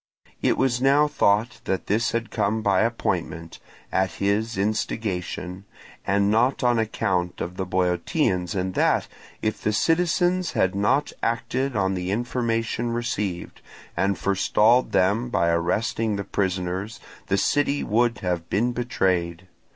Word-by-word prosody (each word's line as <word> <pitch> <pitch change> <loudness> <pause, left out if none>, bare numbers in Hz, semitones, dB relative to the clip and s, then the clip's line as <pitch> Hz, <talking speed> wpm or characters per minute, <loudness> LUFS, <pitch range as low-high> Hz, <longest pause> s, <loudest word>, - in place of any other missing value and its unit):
It - - +2
was 125 -2 +1
now 140 +3 +4
thought 115 -5 +1
that 95 -3 -2
this 110 +3 +1
had 115 0 -3
come 110 0 0
by 100 -3 +3
appointment, 85 -7 -2 0.3
at 95 -2 +1
his 105 +3 -1
instigation, 95 -3 -3 0.4
and 100 +1 +2
not 125 +5 +2
on 120 -1 +3
account 95 -5 -1
of 90 - -4
the 95 0 -3
Boeotians, 90 - 0
and 95 0 -2
that, - - +2 0.4
if 110 - -1
the 105 - +1
citizens 175 - +1
had 95 - +1
not 125 +9 +1
acted 120 +3 -1
on 95 -2 +1
the 90 -1 -3
information 115 +1 -1
received, 105 -7 -3 0.3
and 100 -1 +1
forestalled 105 +5 +3
them 105 +6 +2
by 85 -7 +1
arresting 100 +6 0
the 100 - -3
prisoners, 95 +2 -2 0.3
the 100 - +1
city 145 +5 +1
would 115 +2 +1
have 90 -2 -2
been 120 +5 +1
betrayed. 95 -8 -1
105 Hz, 135 wpm, -24 LUFS, 95-120 Hz, 0.4 s, now